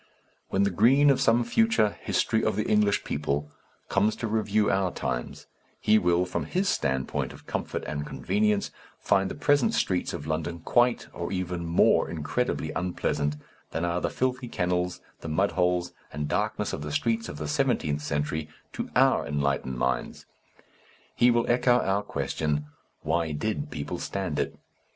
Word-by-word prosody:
When 95 Hz, -, +2 dB
the 100 Hz, -, +2 dB
Green 135 Hz, +10 st, +5 dB
of 135 Hz, -, +1 dB
some 115 Hz, +1 st, +4 dB
future 220 Hz, -, +2 dB
History -, -, +1 dB
of -, -, +1 dB
the -, -, -1 dB
English 105 Hz, -1 st, +3 dB
People 75 Hz, 0 st, -2 dB, 0.4 s
comes 105 Hz, +1 st, +2 dB
to -, -, -4 dB
review 110 Hz, -1 st, +1 dB
our 95 Hz, -1 st, +2 dB
times, -, -, -4 dB, 0.3 s
he 110 Hz, 0 st, +4 dB
will, 90 Hz, 0 st, +2 dB
from 90 Hz, -, -3 dB
his 190 Hz, +2 st, 0 dB
standpoint 65 Hz, -, -1 dB
of -, -, -14 dB
comfort -, -, -3 dB
and 75 Hz, -1 st, -3 dB
convenience, 105 Hz, +6 st, 0 dB, 0.3 s
find 95 Hz, -1 st, +2 dB
the -, -, -5 dB
present 145 Hz, +10 st, +2 dB
streets 90 Hz, -2 st, 0 dB
of 75 Hz, -, -6 dB
London 80 Hz, +2 st, -2 dB
quite 120 Hz, +6 st, +2 dB
or 85 Hz, -, -4 dB
even 90 Hz, -2 st, -3 dB
more 85 Hz, -, +4 dB
incredibly 80 Hz, +2 st, -2 dB
unpleasant 75 Hz, -4 st, -1 dB, 0.3 s
than 80 Hz, -, -2 dB
are 85 Hz, +1 st, -1 dB
the -, -, 0 dB
filthy 125 Hz, 0 st, -1 dB
kennels, 90 Hz, -4 st, -1 dB, 0.2 s
the 80 Hz, -, -6 dB
mudholes 90 Hz, +1 st, +1 dB, 0.2 s
and 75 Hz, +1 st, -3 dB
darkness -, -, -1 dB
of -, -, -4 dB
the 75 Hz, 0 st, -5 dB
streets 115 Hz, +7 st, 0 dB
of 70 Hz, -, -7 dB
the 75 Hz, 0 st, -4 dB
seventeenth 75 Hz, 0 st, 0 dB
century 75 Hz, +1 st, -2 dB, 0.2 s
to -, -, -4 dB
our -, -, +4 dB
enlightened 70 Hz, -3 st, -1 dB
minds. 65 Hz, +1 st, -2 dB, 0.9 s
He 120 Hz, -, +5 dB
will 120 Hz, -1 st, +3 dB
echo 120 Hz, 0 st, +4 dB
our 100 Hz, -3 st, +1 dB
question, 75 Hz, -7 st, -2 dB, 0.4 s
"Why 80 Hz, 0 st, 0 dB
did 110 Hz, -, -2 dB
people 80 Hz, -, -5 dB
stand 95 Hz, -6 st, -3 dB
it?" -, -, -2 dB
90 Hz, 160 wpm, -27 LUFS, 75-110 Hz, 0.9 s, Green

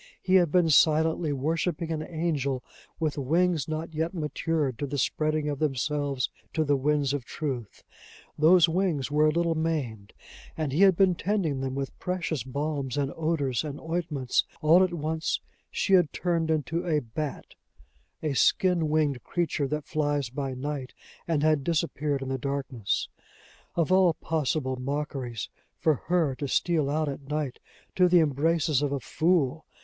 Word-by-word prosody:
He 185 Hz, -, -1 dB
had 175 Hz, -5 st, +5 dB
been 175 Hz, -2 st, +4 dB
silently 160 Hz, +1 st, +4 dB
worshiping 165 Hz, +4 st, -1 dB
an 155 Hz, -1 st, -2 dB
angel 155 Hz, -6 st, -2 dB, 0.4 s
with 155 Hz, -3 st, -1 dB
wings 165 Hz, +2 st, +1 dB
not 160 Hz, +1 st, -4 dB
yet 160 Hz, +3 st, -2 dB
matured 150 Hz, -4 st, -1 dB
to 145 Hz, -, -2 dB
the 140 Hz, +1 st, -3 dB
spreading 155 Hz, +3 st, 0 dB
of 145 Hz, -2 st, -2 dB
themselves 140 Hz, -2 st, -1 dB, 0.2 s
to 160 Hz, -, +1 dB
the 145 Hz, -1 st, +2 dB
winds 145 Hz, 0 st, +1 dB
of 145 Hz, -3 st, -2 dB
truth; 125 Hz, -5 st, -5 dB, 0.5 s
those 170 Hz, +3 st, +6 dB
wings 165 Hz, -6 st, 0 dB
were 150 Hz, +1 st, +4 dB
a -, -, +4 dB
little 170 Hz, +1 st, +1 dB
maimed, 145 Hz, -11 st, -3 dB, 0.4 s
and 155 Hz, -3 st, -1 dB
he 155 Hz, +7 st, +1 dB
had 195 Hz, -2 st, +7 dB
been 190 Hz, 0 st, +4 dB
tending 175 Hz, -7 st, -1 dB
them 135 Hz, 0 st, -3 dB
with 135 Hz, -1 st, -5 dB
precious 175 Hz, -5 st, -2 dB
balms, 140 Hz, 0 st, -3 dB
and 140 Hz, -1 st, -1 dB
odors, 155 Hz, -6 st, 0 dB
and 145 Hz, -2 st, -5 dB
ointments: 160 Hz, -6 st, -1 dB, 0.2 s
all 165 Hz, +4 st, +6 dB
at 185 Hz, -, +1 dB
once 160 Hz, -1 st, -1 dB, 0.3 s
she 195 Hz, -, 0 dB
had 175 Hz, -6 st, +5 dB
turned 170 Hz, -3 st, -1 dB
into 160 Hz, +2 st, 0 dB
a 160 Hz, -4 st, +1 dB
bat, 140 Hz, +5 st, -5 dB, 0.7 s
a 150 Hz, -2 st, 0 dB
skin 170 Hz, +3 st, +3 dB
winged 150 Hz, -5 st, +1 dB
creature 165 Hz, -5 st, -1 dB
that 150 Hz, +1 st, -3 dB
flies 145 Hz, -5 st, -1 dB
by 135 Hz, -1 st, -3 dB
night, 135 Hz, 0 st, -5 dB, 0.3 s
and 155 Hz, -3 st, +1 dB
had 155 Hz, -3 st, +3 dB
disappeared 150 Hz, -4 st, -1 dB
in 135 Hz, -, -5 dB
the 135 Hz, 0 st, -2 dB
darkness! 135 Hz, -5 st, -2 dB, 0.7 s
Of 170 Hz, 0 st, +1 dB
all 185 Hz, -3 st, +5 dB
possible 145 Hz, -4 st, -1 dB
mockeries, 130 Hz, -4 st, -3 dB, 0.3 s
for 160 Hz, -, +3 dB
her 170 Hz, -6 st, +2 dB
to 145 Hz, -, -3 dB
steal 155 Hz, 0 st, +1 dB
out 155 Hz, +1 st, 0 dB
at 140 Hz, 0 st, -6 dB
night 150 Hz, -4 st, -2 dB, 0.4 s
to 180 Hz, -1 st, +6 dB
the 175 Hz, 0 st, +6 dB
embraces 155 Hz, 0 st, +2 dB
of 145 Hz, -1 st, 0 dB
a 140 Hz, -, -1 dB
fool! 160 Hz, +1 st, 0 dB
150 Hz, 165 wpm, -27 LUFS, 140-165 Hz, 0.7 s, had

